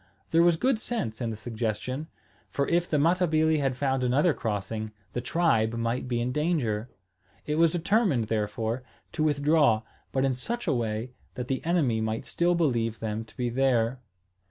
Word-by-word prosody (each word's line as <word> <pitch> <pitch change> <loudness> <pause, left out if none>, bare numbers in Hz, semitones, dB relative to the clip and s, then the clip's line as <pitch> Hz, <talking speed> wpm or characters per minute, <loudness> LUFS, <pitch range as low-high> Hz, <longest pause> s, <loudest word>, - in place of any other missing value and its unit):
There 165 - +5
was 170 -1 +4
good 255 +3 +2
sense 130 - -3
in 115 - -1
the 110 - -3
suggestion; 120 +6 -3 0.4
for 140 - -1
if 175 +1 +1
the 150 - +2
Matabili 160 -1 +3
had 135 -3 0
found 135 -1 0
another 145 +7 +3
crossing, 110 -1 -3 0.2
the 120 - -2
tribe 120 -7 +2
might 115 +2 -1
be 120 -2 -1
in 120 +2 -1
danger. 130 -8 0 0.6
It 150 +1 -1
was 165 -1 +4
determined, 180 - +2
therefore, 110 +2 -2 0.3
to 155 - -1
withdraw, 145 -6 +3 0.3
but 135 0 +1
in 135 - +2
such 235 - -4
a 160 - +2
way 115 0 -2 0.2
that 125 0 -5
the 135 - -1
enemy 150 -10 +1
might 110 0 -2
still 175 +1 +1
believe 120 -9 0
them 110 0 -3
to - - -20
be 125 -1 0
there. 125 -1 +1
130 Hz, 175 wpm, -27 LUFS, 115-160 Hz, 0.6 s, There